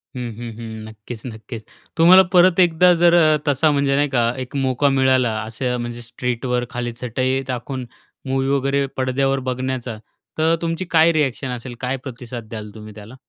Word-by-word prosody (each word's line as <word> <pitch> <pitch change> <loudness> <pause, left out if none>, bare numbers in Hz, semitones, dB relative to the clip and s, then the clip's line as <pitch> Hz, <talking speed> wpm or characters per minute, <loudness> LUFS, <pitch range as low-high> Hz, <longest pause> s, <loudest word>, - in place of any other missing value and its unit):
हं, 125 -2 -4
हं, 120 -1 -6
हं. 110 -1 -7
नक्कीच, 110 +1 -10
नक्कीच. 110 -1 -8 0.3
तुम्हाला 180 +3 +8
परत 180 0 +5
एकदा 180 0 +5
जर 170 -1 +6
अ, 155 -3 +5
तसा, 145 +2 +3
म्हणजे 140 -1 +1
नाही 145 +1 +1
का, 120 -3 +2
एक 130 +2 -7
मौका 135 +1 +1
मिळाला, 130 -3 +2
असं 125 +2 -2
म्हणजे 120 0 -6
स्ट्रीटवर 125 +1 -2
खाली 120 -1 -4
चटई 130 +3 -2
टाकून 130 +1 -4 0.4
मूव्ही 135 0 -1
वगैरे 140 0 +1
पडद्यावर 135 +1 0
बघण्याचा, 130 -2 -3 0.4
तर 160 +1 +3
तुमची 165 +2 -2
काय 165 0 +5
रिएक्शन 135 -4 -1
असेल? 120 +1 -8
काय 130 +1 -2
प्रतिसाद 120 -3 -8
द्याल 110 -2 -7
तुम्ही 110 -1 -10
त्याला? 110 +3 -11
130 Hz, 165 wpm, -20 LUFS, 120-140 Hz, 0.4 s, तुम्हाला